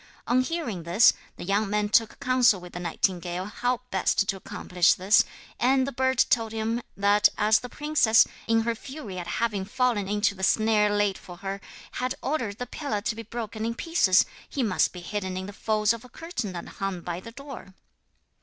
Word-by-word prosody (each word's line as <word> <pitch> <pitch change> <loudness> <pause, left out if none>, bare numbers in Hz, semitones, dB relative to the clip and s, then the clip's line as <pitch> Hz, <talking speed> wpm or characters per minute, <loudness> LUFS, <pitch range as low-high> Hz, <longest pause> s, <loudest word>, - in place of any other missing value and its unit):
On 250 +1 +3
hearing 255 - -3
this, 175 +7 +5 0.2
the - - -7
young 200 +3 0
man 210 0 +1
took 220 +1 +2
counsel 255 -6 +4
with 180 0 -12
the 175 - -5
nightingale 175 +1 -1
how 245 +4 -1
best 190 +1 +1
to - - 0
accomplish 180 -2 +1
this, 195 +4 +4 0.4
and 260 +2 +3
the 275 - -3
bird 260 +1 0
told 225 -2 +2
him 225 +2 -1 0.2
that 205 +1 +4
as 215 +1 +4
the 250 - -8
princess, 295 -7 +4 0.2
in 225 0 +3
her 235 +1 0
fury 230 -6 -8
at 175 - -6
having 215 -4 -1
fallen 235 -2 0
into 205 0 +1
the 190 - -11
snare 215 +1 +3
laid 205 -1 +1
for 175 -1 -11
her, 195 +1 -3 0.3
had 255 +1 -2
ordered 245 -8 -2
the 250 - -4
pillar 245 -7 -3
to 215 - -2
be 230 - -6
broken 220 -1 -6
in 230 +1 -2
pieces, 235 - +3 0.2
he 275 - -1
must 205 -5 +2
be 180 - -9
hidden 190 0 -4
in 190 - -4
the 205 - -8
folds 215 +1 +1
of 230 - -8
a 250 - -14
curtain 250 - -5
that 170 - -6
hung 195 -3 -2
by 175 0 -4
the 230 +5 -10
door. 245 -7 -10
215 Hz, 200 wpm, -26 LUFS, 195-245 Hz, 0.4 s, this